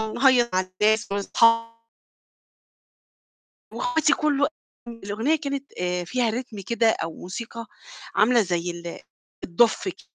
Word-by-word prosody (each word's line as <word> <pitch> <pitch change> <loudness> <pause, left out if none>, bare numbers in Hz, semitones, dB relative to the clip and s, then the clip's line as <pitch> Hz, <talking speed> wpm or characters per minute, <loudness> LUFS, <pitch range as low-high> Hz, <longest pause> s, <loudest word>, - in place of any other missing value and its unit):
نهيّص 250 -2 +4
مع 185 - +3 0.2
الناس 220 +1 +2
وأصحا 230 +3 +2 1.9
وأخواتي 320 -2 +2
كل 295 -2 0
و 285 - +5 0.4
الأغنية 230 +6 -1
كانت 280 -2 -5
آآ، 180 0 -1
فيها 240 +5 0
ريتم 235 -1 -5
كده 235 -1 +2
أو 165 -6 -1
موسيقى 230 +5 -7 0.5
عاملة 230 +4 +4
زي 175 -2 -3 0.6
الدُف 225 - +2
ك - - -10
230 Hz, 110 wpm, -24 LUFS, 200-255 Hz, 1.9 s, و